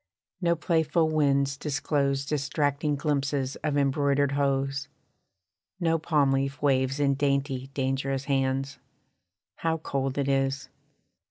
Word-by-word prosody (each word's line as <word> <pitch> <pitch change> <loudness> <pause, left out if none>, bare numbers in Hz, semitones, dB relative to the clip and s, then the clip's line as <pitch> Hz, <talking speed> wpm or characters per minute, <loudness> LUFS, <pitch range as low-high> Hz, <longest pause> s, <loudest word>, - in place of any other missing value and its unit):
No 170 -1 +2
playful 160 -1 +1
winds 140 -2 +2
disclose 140 -1 -1
Distracting 145 0 0
glimpses 140 -2 -1
of 145 -1 -1
embroidered 140 0 +2
hose: 140 0 0 0.9
No 165 -2 +1
palm 150 -4 +2
leaf 135 +1 -1
waves 135 -1 +1
in 140 -1 +3
dainty, 140 -1 0
dangerous 135 0 -1
hands. 135 -1 -1 0.8
How 165 0 0
cold 135 -3 -3
it 140 -1 0
is! 135 0 0
140 Hz, 110 wpm, -27 LUFS, 135-145 Hz, 0.9 s, in